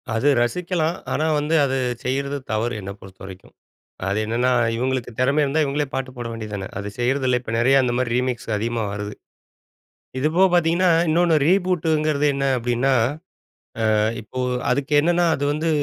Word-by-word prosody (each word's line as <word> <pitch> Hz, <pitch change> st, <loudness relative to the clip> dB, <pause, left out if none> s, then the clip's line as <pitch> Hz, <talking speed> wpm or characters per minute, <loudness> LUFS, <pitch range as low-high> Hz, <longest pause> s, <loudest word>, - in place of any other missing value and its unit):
அது 115 Hz, +6 st, +1 dB
ரசிக்கலாம். 170 Hz, +4 st, -1 dB, 0.2 s
ஆனா 155 Hz, -, 0 dB
வந்து, 150 Hz, +3 st, 0 dB
அது 135 Hz, 0 st, -1 dB, 0.3 s
செய்றது 140 Hz, +2 st, -2 dB
தவறு. 115 Hz, +3 st, -1 dB
என்னை 100 Hz, +1 st, -6 dB
பொறுத்த 95 Hz, -1 st, -14 dB
வரைக்கும். 95 Hz, 0 st, -12 dB, 0.5 s
அது 100 Hz, +2 st, 0 dB
என்னன்னா, 120 Hz, +3 st, +1 dB, 0.2 s
இவங்களுக்கு 125 Hz, 0 st, -2 dB
திறம 140 Hz, +4 st, +2 dB
இருந்தா, 145 Hz, +3 st, +1 dB
இவங்களே 145 Hz, +1 st, -1 dB
பாட்டு 130 Hz, -1 st, -3 dB
போட 120 Hz, -, -4 dB
வேண்டியது 110 Hz, -2 st, -7 dB
தான. 95 Hz, -1 st, -5 dB
அது 100 Hz, -, -5 dB
செய்றதில்ல. 125 Hz, 0 st, +1 dB
இப்ப 115 Hz, -, -6 dB
நிறைய 130 Hz, +3 st, +4 dB
அந்த 125 Hz, -1 st, 0 dB
மாரி 125 Hz, -2 st, -1 dB
ரீமிக்ஸ் 125 Hz, -2 st, -2 dB
அதிகமா 115 Hz, +1 st, -2 dB
வருது. 105 Hz, 0 st, -5 dB, 1.1 s
இது 150 Hz, +4 st, +1 dB
போக 190 Hz, -, +6 dB
பார்த்தீங்கன்னா, 175 Hz, +2 st, +3 dB, 0.2 s
இன்னொன்னு 170 Hz, +1 st, +3 dB
ரீபூட்ங்கிறது 160 Hz, -5 st, +1 dB
என்ன 135 Hz, 0 st, -2 dB
அப்டின்னா 120 Hz, +3 st, 0 dB, 1.0 s
அ -, -, +3 dB, 0.2 s
இப்போ 110 Hz, +4 st, -9 dB, 0.3 s
அதுக்கு 140 Hz, +3 st, -1 dB
என்னென்னா 175 Hz, +3 st, +2 dB
அது 140 Hz, -, -2 dB
வந்து 155 Hz, +2 st, -2 dB
135 Hz, 160 wpm, -22 LUFS, 120-155 Hz, 1.1 s, போக